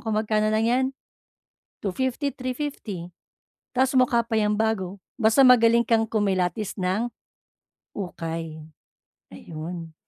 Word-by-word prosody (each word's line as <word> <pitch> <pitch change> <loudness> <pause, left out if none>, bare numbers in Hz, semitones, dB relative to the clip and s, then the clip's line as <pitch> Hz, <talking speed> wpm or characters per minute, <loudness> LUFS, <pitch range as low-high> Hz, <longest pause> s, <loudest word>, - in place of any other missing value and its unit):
kung 220 -1 -1
magkano 215 0 +1
lang 220 +1 +2
'yan? 255 +3 +2 1.0
250, 260 +8 -1
350. 255 - -5 0.7
Tapos 260 +1 +3
mukha 240 -2 +4
pa 230 - -16
'yang 210 0 +1
bago, 205 -4 -1 0.2
basta 225 +5 +5
magaling 235 -2 +6
kang 225 -1 +2
kumilatis 200 -1 0
ng 190 +6 0 0.9
ukay. 165 -4 -5 0.7
Ayun. 165 - -7
215 Hz, 105 wpm, -25 LUFS, 180-240 Hz, 1.0 s, magaling